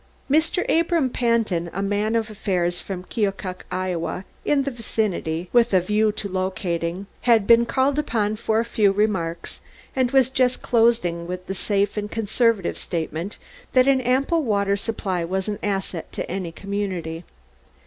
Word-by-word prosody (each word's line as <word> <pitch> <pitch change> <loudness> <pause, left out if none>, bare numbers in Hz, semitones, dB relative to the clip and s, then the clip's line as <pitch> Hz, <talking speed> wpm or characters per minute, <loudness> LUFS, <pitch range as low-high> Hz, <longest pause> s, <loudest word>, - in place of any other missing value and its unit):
Mr. 320 +4 +2
Abram 330 -5 +2
Pantin, 225 -9 +1
a 195 - -2
man 205 +3 0
of 225 -1 0
affairs 180 -4 -1
from 185 -2 -5
Keokuk, 195 -3 -3
Iowa, 185 0 -2 0.2
in 285 -2 +2
the 275 - -2
vicinity 200 -8 -2
with 235 -4 +4
a - - +7
view 210 +4 +2
to 205 - -4
locating, 185 -1 -2 0.2
had 225 -4 +5
been 235 +1 +6
called 270 +4 +2
upon 215 -7 0
for 220 0 +1
a 230 - 0
few 215 -3 +3
remarks 195 -5 -1 0.3
and 260 -2 +2
was 260 -1 +3
just 255 -1 +1
closing 225 -8 +2
with 180 0 -5
the 190 - -3
safe 200 +1 0
and 210 0 -2
conservative 225 -2 +1
statement 165 +2 -4 0.4
that 255 0 +5
an 270 -1 +4
ample 270 +7 +2
water 200 -6 +1
supply 195 -4 -2
was 190 +3 -2
an 210 -1 -3
asset 195 -4 -3
to - - -4
any 185 -3 -4
community. 185 -4 -4
205 Hz, 160 wpm, -23 LUFS, 185-235 Hz, 0.4 s, a